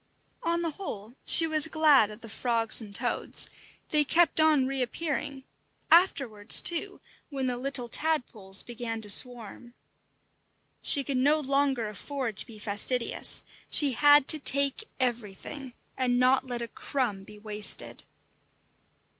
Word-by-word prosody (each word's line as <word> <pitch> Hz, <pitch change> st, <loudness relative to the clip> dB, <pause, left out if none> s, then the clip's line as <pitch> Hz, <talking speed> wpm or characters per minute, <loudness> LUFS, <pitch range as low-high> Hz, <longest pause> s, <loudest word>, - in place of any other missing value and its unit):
On 340 Hz, 0 st, -2 dB
the 330 Hz, -, -3 dB
whole 235 Hz, -, -9 dB
she 330 Hz, -, +7 dB
was 315 Hz, -1 st, +1 dB
glad 305 Hz, -9 st, +3 dB
of 210 Hz, +2 st, -12 dB
the 230 Hz, -, -11 dB
frogs 230 Hz, +1 st, -1 dB
and 205 Hz, -2 st, -10 dB
toads; -, -, -1 dB, 0.4 s
they 300 Hz, -1 st, +3 dB
kept 325 Hz, +3 st, +2 dB
on 305 Hz, -4 st, +3 dB
reappearing, 270 Hz, +1 st, -4 dB, 0.5 s
afterwards 270 Hz, -, +3 dB
too, 375 Hz, +4 st, +1 dB, 0.3 s
when 275 Hz, -3 st, -4 dB
the 250 Hz, -1 st, -2 dB
little 250 Hz, -1 st, -4 dB
tadpoles 230 Hz, -10 st, -2 dB
began 235 Hz, -1 st, -6 dB
to 210 Hz, -1 st, +4 dB
swarm. 240 Hz, +1 st, +3 dB, 1.1 s
She 280 Hz, -, +4 dB
could 270 Hz, 0 st, -3 dB
no 290 Hz, +4 st, +2 dB
longer 275 Hz, -4 st, -1 dB
afford 235 Hz, +3 st, -6 dB
to -, -, 0 dB
be 225 Hz, -, -12 dB
fastidious; 215 Hz, +4 st, 0 dB, 0.3 s
she 290 Hz, -3 st, +5 dB
had 290 Hz, +3 st, +4 dB
to 310 Hz, -, +4 dB
take 280 Hz, +7 st, +1 dB
everything, 245 Hz, +2 st, -5 dB, 0.2 s
and 250 Hz, -1 st, -1 dB
not 260 Hz, +1 st, +2 dB
let 240 Hz, -1 st, -5 dB
a -, -, -6 dB
crumb 230 Hz, -5 st, -4 dB
be 210 Hz, +2 st, -15 dB
wasted. 210 Hz, 0 st, -2 dB
255 Hz, 140 wpm, -27 LUFS, 225-290 Hz, 1.1 s, she